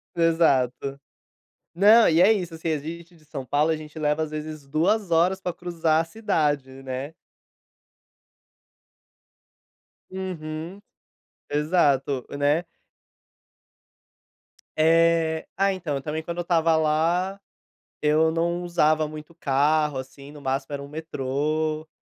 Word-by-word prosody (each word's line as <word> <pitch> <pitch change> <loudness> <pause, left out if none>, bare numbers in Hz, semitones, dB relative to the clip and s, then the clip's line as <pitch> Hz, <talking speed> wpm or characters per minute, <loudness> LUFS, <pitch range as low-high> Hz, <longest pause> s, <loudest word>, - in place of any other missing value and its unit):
Exato. 140 -5 +2 0.7
Não, 210 +5 +6
e 165 +2 +4
é 205 +4 +7
isso, 180 -6 -1
assim, 165 +1 -4
a - - 0
gente 170 +4 -9
de 155 - -22
São 135 -3 -7
Paulo 150 +4 +2
a 160 - 0
gente 155 0 -11
leva 150 0 0
às 155 - -6
vezes 155 -2 -6
2 175 +7 +1
horas 175 +3 +3
pra 180 -2 -3
cruzar 165 -2 0
a - - -2
cidade, 155 -8 -1
né. 135 +3 -5 3.0
Uhum, 180 0 -6 0.7
exato, 145 -4 +1
e, 140 - -6
né. 145 +4 +2 2.1
É. 165 0 +3
Ah, 195 0 +2
então, 150 -7 -3
também 155 +1 -4
quando 170 +1 -5
eu - - +1
estava 165 -2 +2
lá, 165 +5 +1 0.6
eu 155 +2 +3
não 170 +2 -1
usava 155 -3 +2
muito 155 +1 -10
carro, 150 0 +1
assim, 140 +2 -9
no 150 - -12
máximo 135 +1 -2
era 140 - -4
um 140 - -9
metrô. 155 +1 -2
155 Hz, 125 wpm, -24 LUFS, 150-170 Hz, 3.0 s, é